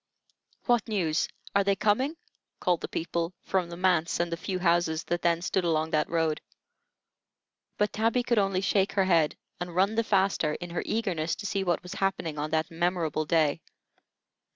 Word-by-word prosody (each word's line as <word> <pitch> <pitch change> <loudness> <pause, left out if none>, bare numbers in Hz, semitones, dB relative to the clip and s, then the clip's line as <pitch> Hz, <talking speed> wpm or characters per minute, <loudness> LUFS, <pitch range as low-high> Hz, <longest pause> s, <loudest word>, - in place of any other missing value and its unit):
"What 240 -3 +2
news? 175 -8 0 0.3
Are 200 - +5
they 200 0 +2
coming?" 255 - +1 0.4
called 175 -2 +1
the - - -3
people, 170 +1 -3
from 185 -3 0
the 170 - -7
Manse 175 -3 +2
and 170 0 0
the - - 0
few 185 +2 -3
houses 170 -2 +1
that 175 0 -2
then 170 0 +1
stood 185 +1 0
along 160 -1 +1
that 150 0 +1
road. 160 -2 0 1.4
But 210 0 +1
Tabby 230 +3 +1
could 240 -2 +2
only 195 -2 +1
shake 195 0 +1
her 195 -1 +3
head 165 -5 +3 0.2
and 175 -1 -5
run 195 +4 +3
the 230 +1 +1
faster, 195 -7 +2
in 175 +2 -6
her 170 - -2
eagerness 180 -8 -1
to 205 - -8
see 195 -1 -1
what 175 -2 0
was 180 +1 -7
happening 190 -6 -1
on 150 +1 -2
that 160 +1 0
memorable 165 -2 0
day. 160 0 +2
175 Hz, 180 wpm, -28 LUFS, 165-195 Hz, 1.4 s, Are